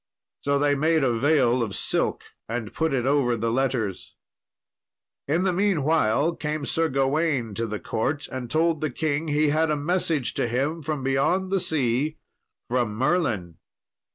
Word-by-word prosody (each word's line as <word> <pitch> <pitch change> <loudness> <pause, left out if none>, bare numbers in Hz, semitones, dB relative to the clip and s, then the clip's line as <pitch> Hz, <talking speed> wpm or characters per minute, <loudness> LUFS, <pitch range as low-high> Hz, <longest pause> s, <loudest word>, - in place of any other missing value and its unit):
So 140 0 +1
they 145 0 +2
made 155 +2 +2
a 125 -3 +2
veil 130 -2 +3
of 110 -4 -2
silk - - -1 0.3
and 115 -2 -4
put 160 -1 0
it 130 -3 0
over 135 -4 +2
the 115 +1 -1
letters. 120 -6 -2 1.1
In 160 +6 +1
the 190 -1 +1
meanwhile 165 - +2
came 150 -1 -3
Sir 165 +2 0
Gawain 135 -3 0
to 115 +3 -2
the 105 -1 -4
court 145 +6 -2
and 130 -2 -5
told 160 +1 +1
the 155 - 0
king 150 +4 -2
he 150 0 +2
had 155 +2 +2
a 150 - +1
message 160 -3 0
to - - -1
him 140 +8 -1
from 150 -2 -3
beyond 140 +8 +1
the 195 - +2
sea, 150 -3 0 0.5
from 120 -3 0
Merlin. 110 - 0
145 Hz, 160 wpm, -25 LUFS, 120-160 Hz, 1.1 s, veil